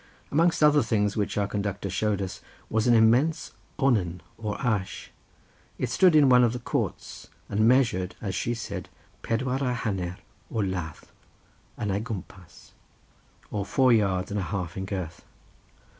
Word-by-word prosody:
Amongst 165 +2 +3
other 150 -1 +6
things 105 -3 0
which 105 -1 -1
our 100 - +2
conductor 100 -1 -3
showed 100 +1 0
us, 95 - -6 0.3
was 110 +1 +1
an 120 - +6
immense 125 +9 +3 0.3
onen 100 - +1
or 105 -2 -4
ash; 105 -7 -2 0.7
it - - -2
stood 180 -4 +5
in 150 -2 +7
one 125 -1 +6
of 120 -1 +2
the 125 - -4
courts, 120 - -4 0.2
and 110 +2 +2
measured, 115 -8 +2
as 100 -3 -4
she 120 +4 -1
said, 100 -5 -6 0.3
pedwar 130 +3 -1
y 125 -2 +1
haner 95 -7 -3 0.3
o - - -10
ladd 90 -7 -2 0.8
yn 105 -3 -1
ei 100 +2 0
gwmpas, 95 -5 -9 0.8
or 105 -1 -2
four 130 +4 +3
yards 100 -3 +1
and 105 - -1
a - - -1
half 90 -4 -3
in 95 - -4
girth. 90 -4 -5
105 Hz, 160 wpm, -26 LUFS, 95-125 Hz, 0.8 s, in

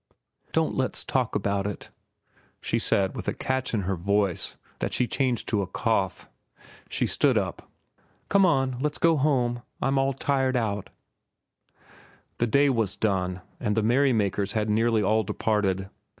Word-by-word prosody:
"Don't - - +1
let's - - -1
talk - - 0
about 100 0 0
it," 105 - -7 0.7
she - - -1
said 95 -1 +1
with - - -6
a - - -1
catch 130 0 -1
in 110 - 0
her 95 +1 -1
voice 100 +1 0 0.2
that - - -2
she 125 - +2
changed 125 -1 -1
to 105 -3 +1
a 95 - -3
cough. 100 -2 -1 0.6
She - - 0
stood - - +2
up. - - -3 0.6
"Come 200 -1 +4
on, 135 -7 +2
let's 150 +1 -1
go 165 -1 +4
home. 125 -5 +1 0.2
I'm 135 0 +1
all 135 0 +1
tired 130 -1 0
out." 105 -4 -2 1.5
The 120 - +2
day 140 +5 +4
was 115 -7 +1
done, 95 -3 -1 0.2
and 105 +1 -1
the 110 - +2
merrymakers 110 -5 +2
had 110 -1 0
nearly 110 0 +2
all 110 +3 +3
departed. 100 -2 0
110 Hz, 155 wpm, -26 LUFS, 100-130 Hz, 1.5 s, Come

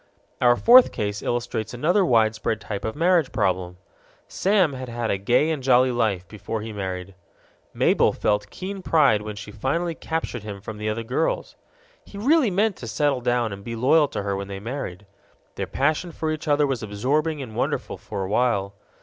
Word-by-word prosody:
Our 120 -1 +5
fourth 245 - +7
case 105 0 -3
illustrates 120 -1 -3
another 175 +10 +2
widespread 110 -5 +2
type 105 -1 -5
of 110 - -3
marriage 170 -2 +2
problem. 90 -3 -1 0.5
Sam 190 -6 +2
had 130 -1 -6
had 120 -1 -2
a 100 - -1
gay 125 +10 +2
and 155 -4 -2
jolly 130 0 +4
life 105 -7 0
before 105 +2 -5
he 110 0 -6
married. 95 -1 -5 0.6
Mabel - - +3
felt 105 -1 -1
keen 190 - -6
pride 145 - +3
when 105 0 -6
she 105 +1 -9
finally 165 +11 -1
captured 160 -7 -4
him 100 -1 -7
from 105 +2 -8
the 105 0 -2
other 110 +2 -2
girls. 130 +8 -1 0.5
He 200 - -12
really 275 +3 +3
meant 200 +2 +1
to 120 - -8
settle 140 +1 0
down 120 -3 0
and 100 0 -9
be 115 +2 -5
loyal 145 +6 +4
to 100 - -4
her 100 -1 -1
when 100 0 -5
they 100 -1 -6
married. 105 -4 -6 0.5
Their - - -4
passion 155 +5 0
for 160 0 -3
each 155 0 -5
other 145 0 +3
was 135 -5 -2
absorbing 140 +10 -1
and 120 -6 -7
wonderful - - -2
for 100 -3 -5
a - - -3
while. 100 -2 +1
120 Hz, 190 wpm, -24 LUFS, 105-155 Hz, 0.6 s, fourth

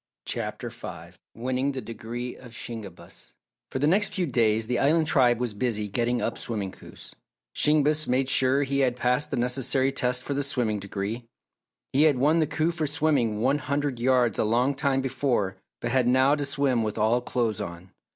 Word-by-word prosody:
CHAPTER - - -4
FIVE - - -9 0.2
WINNING 130 +4 -1
THE 130 - -4
DEGREE 120 +2 -6
OF 120 -3 -13
SHINGEBIS 100 -9 -9 0.4
For - - -4
the 140 - +1
next 195 +7 +3
few 185 -3 0
days 115 -5 +1
the 125 +1 -1
Island 155 +3 +3
Tribe 125 -6 +3
was 120 -3 -2
busy 105 -1 -1
getting 120 +4 -1
up - - -2
Swimming 105 -5 -4
Coups. - - -14 0.4
Shingebis 150 +1 +2
made 130 +1 +1
sure 135 +1 +4
he 140 0 -1
had 130 -3 +2
passed 125 +4 0
the 140 - -2
necessary 130 +2 +1
tests 125 -2 0
for 140 - -2
the 140 - -1
Swimming 125 -7 0
Degree. 100 +4 -5 0.7
He 145 +4 +5
had 150 -4 +4
won 150 +6 +3
the 155 - +2
coup 160 +2 0
for 160 -3 -2
swimming 140 -8 +1
one 135 +4 +2
hundred 140 -2 -2
yards 125 -3 +2
a - - +3
long 120 +5 +2
time 135 -1 0
before 125 -7 -1 0.2
but 120 - -2
had 125 -1 +2
now 130 +3 +4
to 145 -1 0
swim 140 -3 +1
with 105 -1 -3
all 115 +3 +2
clothes 120 -4 -1
on. 85 +2 -8
125 Hz, 190 wpm, -26 LUFS, 115-140 Hz, 0.7 s, He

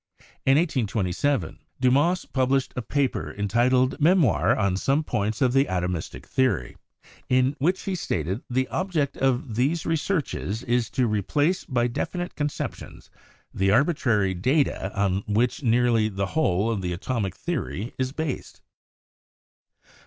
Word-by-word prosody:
In 135 +1 +6
1827, 130 - 0 0.2
Dumas 140 +8 +2
pub 130 -1 0
lished 135 -1 +1
a 125 - -2
paper 140 +1 -1
entitled 125 +6 +2
"Memoir 140 - +4
on 100 -3 +1
some 135 +10 +1
points 110 -2 -1
of 125 -1 +2
the 135 +1 +4
atomistic 90 - -3
theory," 130 - 0 0.5
in 130 +2 +3
which 180 +7 +1
he 195 - -2
stated 95 - -2
that - - -29
"The 130 +1 0
object 170 -7 -1
of 130 -2 0
these 140 +8 0
researches 150 - -1
is 120 -1 0
to 130 - +4
replace 145 - 0
by 120 -3 0
definite 175 +9 -3
conceptions 145 -1 -5 0.4
the 95 +1 +1
arbitrary 120 - +2
data 125 - 0
on 100 -1 +1
which 115 +6 +1
nearly 115 -3 +3
the 100 -1 -2
whole 115 - +1
of 105 -4 -2
the 90 -1 -2
atomic 100 0 -3
theory 125 - -4
is 130 0 0
based." 155 -1 -5
125 Hz, 140 wpm, -25 LUFS, 105-145 Hz, 0.5 s, In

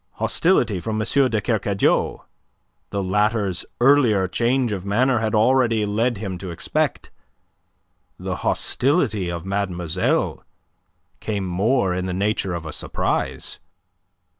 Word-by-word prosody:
Hostility - - +1
from 110 +5 -3
M. 110 - -1 0.2
de 110 - 0
Kercadiou, 100 -3 0 0.7
the 100 -1 -2
latter's 105 -1 0
earlier 120 -7 +4
change 120 +4 +1
of 95 -3 -3
manner 120 +5 +2
had 110 0 -1
already 115 -1 +3
led 110 +3 0
him 95 -3 -5
to 95 0 -6
expect; 85 - -2 1.1
the - - -4
hostility 125 - +1
of 85 0 -5
mademoiselle 95 -3 -1 0.8
came 100 -3 -3
more 95 +3 +1
in 90 +1 -2
the 90 - -3
nature 100 -1 -1
of 85 -1 -6
a 80 - -6
surprise. - - -2
105 Hz, 120 wpm, -22 LUFS, 95-115 Hz, 1.1 s, earlier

